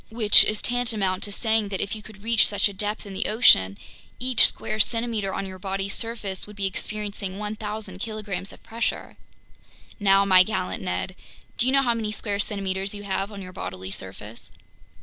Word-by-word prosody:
Which 220 -2 +8
is 215 -1 -1
tantamount 220 -6 0
to 205 - -5
saying 220 0 +1
that 190 -2 -3
if 200 - -2
you 215 - -8
could 210 -1 -15
reach 230 0 +4
such 205 - +1
a 200 - -7
depth 210 +3 -3
in 200 - -8
the 190 - -2
ocean, 100 - +5 0.4
each 255 -1 +5
square 215 0 -4
centimeter 225 -3 0
on 195 - -3
your 185 -1 -9
body's 195 +1 -2
surface 215 -5 -4
would 210 - -12
be 200 -1 -2
experiencing 200 0 -4
1,000 210 -2 -5
kilograms 205 -3 -4
of - - -16
pressure. 230 +1 -3 0.8
Now, 195 -1 +4
my 185 -2 +7
gallant 185 - -1
Ned, 90 - -3 0.4
do 240 - +1
you - - +3
know 275 0 +4
how 240 -2 +2
many 220 -2 -3
square 205 -1 -3
centimeters 195 -1 -2
you 205 - -7
have 195 +1 -2
on 200 -2 -8
your 185 0 -10
bodily 95 - -6
surface?" 105 +4 -7
205 Hz, 190 wpm, -24 LUFS, 190-220 Hz, 0.8 s, Which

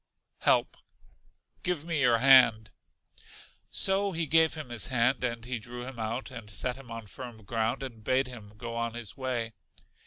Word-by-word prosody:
Help. - - +2 0.8
Give 175 -4 -1
me 165 -4 -1
your 120 -3 +5
hand. 120 -4 +6 1.0
So 195 0 +2
he 165 0 -1
gave 160 +1 +4
him 155 -5 -7
his 120 -4 +1
hand, 125 0 +2
and 120 -2 -2
he 125 -1 -3
drew 120 +2 -6
him 130 -2 -7
out, 115 +4 -3
and 115 -4 -9
set 125 +4 -1
him 135 -2 -13
on 115 -1 -7
firm 115 +2 -9
ground, 115 +5 -1
and 115 -5 -8
bade 130 +4 +2
him 110 -5 -10
go 115 +1 -6
on 115 0 -2
his 120 -3 -6
way. 125 -4 -3
120 Hz, 175 wpm, -29 LUFS, 115-135 Hz, 1.0 s, hand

